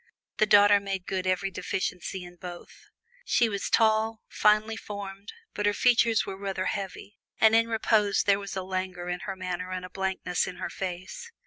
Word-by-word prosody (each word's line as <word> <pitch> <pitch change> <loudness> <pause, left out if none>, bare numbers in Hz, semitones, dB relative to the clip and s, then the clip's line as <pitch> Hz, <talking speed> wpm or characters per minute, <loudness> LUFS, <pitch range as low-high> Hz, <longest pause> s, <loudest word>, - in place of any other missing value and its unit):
The 215 - +3
daughter 205 0 +7
made 195 -2 -4
good 185 -1 -2
every 185 +1 0
deficiency 185 +1 -3
in 175 0 -12
both. 175 0 -10 0.4
She 240 - +3
was 200 -2 -3
tall, 220 0 +2
finely 215 +1 +2
formed, 200 -1 -7 0.2
but 210 0 0
her 205 - +2
features 235 -2 +3
were 190 - -6
rather 195 -2 -3
heavy, 200 +1 -5 0.2
and 220 0 +6
in 230 0 +4
repose 220 -2 +2
there 200 0 +3
was 200 -1 -6
a 190 - -2
languor 185 -1 -4
in 180 0 -2
her 195 - -4
manner 180 -1 -4
and 185 0 -4
a 180 - -11
blankness 190 -2 -1
in 180 - -6
her - - -5
face. 190 - -6
195 Hz, 185 wpm, -27 LUFS, 185-215 Hz, 0.4 s, daughter